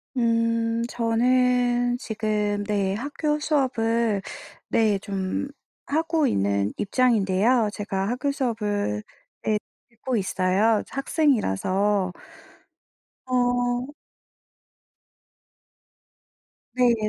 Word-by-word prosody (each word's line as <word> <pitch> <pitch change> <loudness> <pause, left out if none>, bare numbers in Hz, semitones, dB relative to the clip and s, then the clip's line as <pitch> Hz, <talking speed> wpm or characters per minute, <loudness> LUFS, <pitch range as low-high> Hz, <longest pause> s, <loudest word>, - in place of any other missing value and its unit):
음 230 -1 +1
저는 245 +1 +2
지금 210 -3 -1
네 200 -2 0
학교 295 +4 -2
수업을 235 -8 +1 0.5
네 215 -3 +3
좀 195 +5 -3 0.4
하고 320 +1 +1
있는 100 - 0
입장인데요. 220 0 +2
제가 195 -2 -2
학교 260 +4 -1
수업을 210 - -1 0.4
네 215 -1 +1 0.3
듣고 235 +1 -3
있어요 195 +3 +2
학생이라서. 205 - +1 1.1
어 245 0 +1 2.9
네. 250 -1 +4
230 Hz, 150 characters per minute, -24 LUFS, 205-250 Hz, 2.9 s, 네